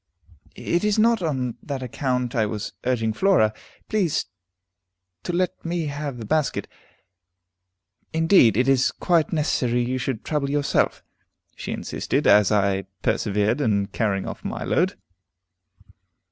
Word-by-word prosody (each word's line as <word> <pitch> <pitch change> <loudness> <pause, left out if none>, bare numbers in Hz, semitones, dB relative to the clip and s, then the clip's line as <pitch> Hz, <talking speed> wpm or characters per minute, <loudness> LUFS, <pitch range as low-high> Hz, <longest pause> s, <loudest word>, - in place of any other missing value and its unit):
"It 170 +2 -1
is 210 0 +2
not 230 0 +3
on 130 -7 -2
that 135 -3 -5
account 125 0 -2
I 110 -3 +1
was 105 -1 -5
urging 115 -3 +1
Flora. 145 - +3 0.3
Please 190 -8 0 1.0
to - - -4
let 180 +1 -1
me 170 -1 -2
have 145 -2 -4
the 115 - -7
basket. 155 +5 0 1.4
Indeed, 160 - +4
it 125 +2 +2
is 135 -1 +4
quite 170 -4 +1
unnecessary 125 -6 0
you 130 +1 -2
should 125 -3 -3
trouble 150 -3 -1
yourself," 145 0 0 0.5
she - - -6
insisted, - - -2
as 105 -1 +5
I 100 -2 +1 0.2
persevered 105 +5 +1
in 100 -5 +1
carrying 100 -2 -1
off - - -7
my - - -4
load. - - +1
130 Hz, 130 wpm, -23 LUFS, 110-160 Hz, 1.4 s, as